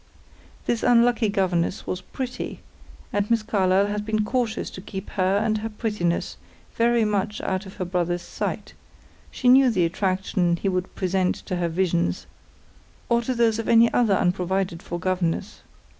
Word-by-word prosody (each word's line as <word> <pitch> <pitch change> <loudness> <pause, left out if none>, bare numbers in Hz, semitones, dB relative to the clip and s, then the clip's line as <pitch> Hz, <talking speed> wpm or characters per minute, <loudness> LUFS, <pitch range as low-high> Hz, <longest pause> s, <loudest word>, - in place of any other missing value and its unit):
This 235 - 0
unlucky 240 -2 +4
governess 185 -3 0
was 185 - -3
pretty, 250 +6 -6 0.5
and 205 0 0
Miss 230 -2 +2
Carlyle 195 -2 +2
had 205 0 -2
been 215 0 0
cautious 235 -1 -1
to 185 - -9
keep 190 -1 -7
her 190 0 +1
and 215 0 +1
her 225 +1 -4
prettiness 210 -6 -2 0.4
very 235 -1 +3
much 210 0 -1
out 190 +1 -2
of 190 - -11
her 185 - -3
brother's 175 -1 -1
sight; - - -4 0.6
she 250 - -2
knew 260 +1 +7
the 185 -7 +2
attraction 185 0 0
he 195 - -1
would 185 0 -3
present 185 -1 0
to 180 - -2
her 175 -1 0
visions, 170 0 0 0.8
or 235 0 +3
to 255 +2 -2
those 230 -1 +2
of 225 - -3
any 230 0 +5
other 225 -5 +3
unprovided 180 -1 0
for 175 - -5
governess. 180 -2 -2
195 Hz, 160 wpm, -24 LUFS, 185-225 Hz, 0.8 s, knew